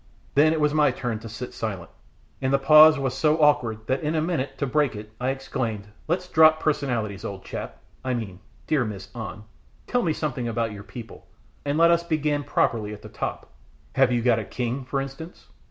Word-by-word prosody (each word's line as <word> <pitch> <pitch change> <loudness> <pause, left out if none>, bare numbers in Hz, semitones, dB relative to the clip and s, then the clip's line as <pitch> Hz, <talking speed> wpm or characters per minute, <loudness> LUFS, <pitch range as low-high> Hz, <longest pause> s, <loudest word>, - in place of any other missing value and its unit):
Then 155 +3 +5
it 160 - 0
was 150 -1 +2
my 150 -2 +4
turn 120 -3 -3
to 115 0 -9
sit 125 +3 -7
silent, 100 -6 -5 0.5
and 130 0 0
the 140 - +5
pause 155 +2 +8
was 135 -2 -1
so 150 +3 +2
awkward 115 -7 +2
that 130 +3 0
in 155 +1 -1
a - - +2
minute, 145 -5 -2
to 140 - -1
break 145 -2 +1
it, 105 +1 -9
I 130 - +1
exclaimed 125 -6 -3 0.2
"Let's 180 +3 -1
drop 160 -2 +6
personalities, 120 -10 -1
old 100 -1 -6
chap - - -6 0.3
I 130 -1 -1
mean 110 -5 -4
my 90 - -16 0.3
dear 150 -5 +2
Miss 100 -4 -6
An. 110 -3 -7 0.4
Tell 245 - +1
me 165 -7 +1
something 130 -6 -3
about 115 -1 -1
your 100 -1 -8
people, 115 +1 -11 0.4
and 145 +1 0
let 170 +1 +6
us 170 0 +3
begin 150 -3 0
properly 110 -6 0
at 105 - -11
the - - -9
top: - - -5 0.4
have 135 -1 +4
you 120 -1 +1
got 120 -2 +3
a - - -3
king, 125 +4 -3
for 135 +2 -2
instance?" 135 +5 -8
135 Hz, 210 wpm, -25 LUFS, 115-150 Hz, 0.5 s, pause